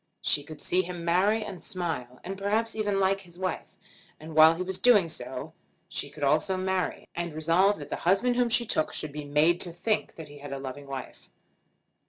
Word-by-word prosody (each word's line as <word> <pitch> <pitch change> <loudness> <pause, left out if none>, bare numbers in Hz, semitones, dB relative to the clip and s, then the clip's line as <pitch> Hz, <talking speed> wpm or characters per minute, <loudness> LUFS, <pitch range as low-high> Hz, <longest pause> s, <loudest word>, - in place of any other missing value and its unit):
She 145 - +2
could 150 +1 -11
see 185 - +3
him 175 -1 -6
marry, 200 +6 +3
and 190 -4 -7
smile, 160 - -4
and 190 +2 -5
perhaps 215 +4 0
even 205 -2 0
like 195 0 +2
his 175 -2 -13
wife. 185 0 -4 0.4
And 155 +1 -9
while 160 +1 +8
he 180 - -3
was 190 0 -2
doing 210 -8 +5
so, 160 0 -5 0.3
she 145 - -3
could 145 +1 -8
also 155 +7 +2
marry, 185 0 -2
and 170 -2 -4
resolve 170 +6 +3
that 145 - -9
the - - -3
husband 200 +8 +2
whom 245 -1 +2
she 235 +1 +3
took 155 -7 0
should 155 - -3
be 150 0 -6
made 150 +4 +3
to 175 - 0
think 210 +6 -1
that 160 -2 -9
he 145 0 -13
had 140 -1 -7
a - - -3
loving 135 +1 -7
wife. 135 -2 -8
175 Hz, 210 wpm, -28 LUFS, 155-195 Hz, 0.4 s, while